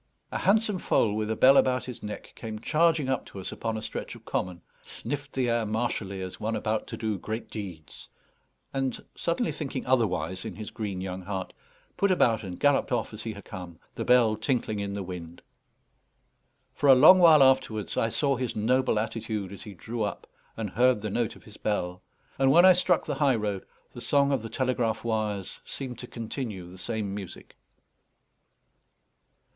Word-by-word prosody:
A - - -2
handsome 210 -1 +3
foal 105 -10 +2
with 110 0 -2
a 110 - 0
bell 135 +4 +7
about 130 0 +3
his 125 -2 -7
neck 105 0 -7
came 110 -2 -6
charging 155 +4 +2
up 130 -1 0
to 100 - -9
us 95 - -5
upon 115 -1 -3
a 110 - -6
stretch 110 - -5
of - - -15
common, 90 -1 -3 0.2
sniffed 140 +3 -5
the 130 -2 0
air 115 -1 +1
martially 105 -3 -2
as 95 - -7
one 110 +1 -1
about 110 -1 -1
to - - -6
do 110 -3 -2
great 110 +5 -5
deeds, 90 -8 -8 0.6
and, 135 -2 -2
suddenly 170 +8 -1
thinking 135 -4 -4
otherwise 95 -7 +1
in - - -6
his 105 0 -7
green 100 -4 -4
young 95 0 -4
heart, 95 0 -5 0.4
put 200 - +3
about 115 - +3
and 90 -3 -7
galloped 145 -1 +3
off 120 -2 -1
as 110 - -6
he 110 0 -4
had 100 - -11
come, 90 -3 -8 0.2
the - - -4
bell 120 -3 +5
tinkling 110 -1 -1
in 100 0 -3
the 100 -1 -3
wind. 85 -2 -8 1.3
For 145 - +2
a 135 - +10
long 160 +8 +9
while 160 -5 +8
afterwards 130 -6 +2
I 115 - +1
saw 140 +3 +1
his 125 -2 -3
noble 125 +2 +2
attitude 110 -3 -3
as 100 - -9
he 105 -2 -9
drew 115 +6 -5
up, 105 - -2 0.3
and 110 -4 -3
heard 125 -2 +3
the 105 - -2
note 120 +1 -1
of - - -16
his 105 -1 -14
bell; 90 -4 -2 0.4
and 135 0 +4
when 170 +6 +7
I 185 - +9
struck 180 -1 +2
the - - -2
high 135 -3 +4
road, 105 -3 -3 0.3
the - - -8
song 140 0 +3
of 135 -4 +1
the 115 - -7
telegraph 120 -3 0
wires 110 -4 -2
seemed 130 -3 -6
to 125 - -7
continue 110 -6 -5
the 95 - -12
same 105 -1 -3
music. 100 -3 -8
110 Hz, 190 wpm, -28 LUFS, 100-130 Hz, 1.3 s, a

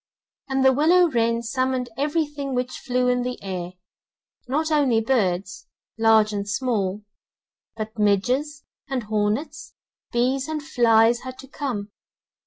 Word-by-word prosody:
And 265 0 +1
the 265 - +6
willow 335 +5 +4
wren 230 -1 +1
summoned 255 +1 -1
everything 290 -1 -2
which 250 0 -3
flew 250 -1 0
in 250 0 +2
the 250 0 -3
air, 180 -2 -5 0.7
not 310 +5 -1
only 275 -7 +3
birds, 200 -5 -1 0.3
large 220 -1 +4
and 200 0 -3
small, 210 -4 -1 0.7
but 220 0 -6
midges, 250 +9 +1 0.3
and 260 -3 -2
hornets, 215 +7 -2 0.4
bees 260 +3 +1
and 310 -1 -4
flies 235 -5 +4
had 255 0 -8
to 270 - -11
come. 245 -8 -4
250 Hz, 130 wpm, -23 LUFS, 215-270 Hz, 0.7 s, the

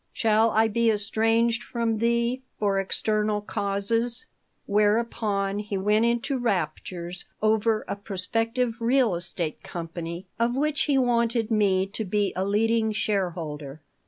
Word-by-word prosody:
Shall 220 0 +3
I 220 +1 +3
be 230 +1 +2
estranged 225 +2 +1
from 230 -3 -2
thee 235 +2 +1 0.2
for 200 -2 +1
external 210 +2 0
causes?" 210 +4 -1 0.4
Whereupon 205 -1 +1
he 210 -1 -3
went 210 +4 +2
into 240 +3 0
raptures 180 -3 -3
over 220 0 +2
a - - -2
prospective 225 +5 -2
real 240 -2 +3
estate 170 -2 -3
company 170 +1 -6
of 235 +1 +1
which 295 +2 +1
he 285 -2 +2
wanted 235 -2 +1
me 195 -3 +3
to 200 +3 -5
be 205 0 0
a 185 - 0
leading 220 +2 +2
shareholder. 165 -9 -2
215 Hz, 130 wpm, -26 LUFS, 195-230 Hz, 0.4 s, Shall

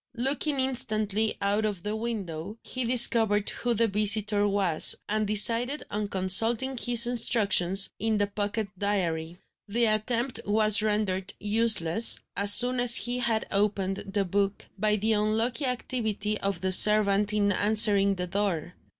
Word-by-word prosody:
Looking 275 +3 -3
instantly 215 -5 -2
out 205 +2 -2
of 205 -5 -6
the 210 +1 -5
window, 205 -4 -8
he 255 -1 -4
discovered 225 -4 +4
who 240 -1 -4
the 230 +1 -1
visitor 205 0 +2
was, 195 -6 +3
and 215 0 -4
decided 230 +7 +3
on 210 0 -4
consulting 225 +7 +2
his 240 -1 +3
instructions 205 -6 +1
in 220 0 -2
the 205 - -1
pocket 205 +1 -6
diary. 175 -5 -4 0.3
The 235 +3 -1
attempt 230 +4 -2
was 215 0 +2
rendered 210 -3 -3
useless, 215 -2 +2 0.2
as 200 0 +3
soon 245 +3 +6
as 245 -1 +4
he 245 +1 -1
had 225 -3 -2
opened 195 -1 -3
the 200 0 -5
book, 200 +2 -4
by 210 +1 -2
the 220 +2 -2
unlucky 225 +6 -3
activity 220 -4 -5
of 195 -3 -3
the 190 0 -4
servant 210 +1 +4
in 205 -1 -2
answering 200 -1 +2
the 180 -1 -6
door. 180 -3 -5
210 Hz, 145 wpm, -24 LUFS, 200-230 Hz, 0.3 s, soon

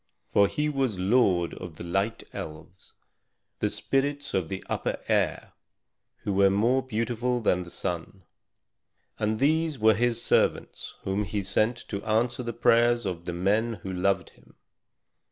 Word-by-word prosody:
For 100 - +6
he 150 +7 -1
was 135 -8 0
lord 95 -3 +2
of 85 -3 -8
the - - -8
Light 95 +6 -1
Elves, 80 +4 -9 0.7
the - - +1
spirits 140 +1 -1
of 90 -4 0
the 95 - -5
upper - - -2
air, - - 0 0.7
who 100 - -1
were 100 0 +5
more 115 +7 +2
beautiful 120 0 -1
than 90 -5 +2
the 90 - -8
sun. 90 +2 -4 1.0
And 110 +1 0
these 155 +3 +2
were 110 -1 +5
his 120 +2 +1
servants - - 0
whom 95 +2 0
he 100 +1 -3
sent 110 +5 +1
to 100 -1 -4
answer 120 +3 +1
the 120 -1 -3
prayers 120 0 +3
of 85 -3 -4
the 90 - -3
men 105 +6 +1
who 95 - -4
loved 95 -1 0
him. - - -23
105 Hz, 155 wpm, -27 LUFS, 95-120 Hz, 1.0 s, For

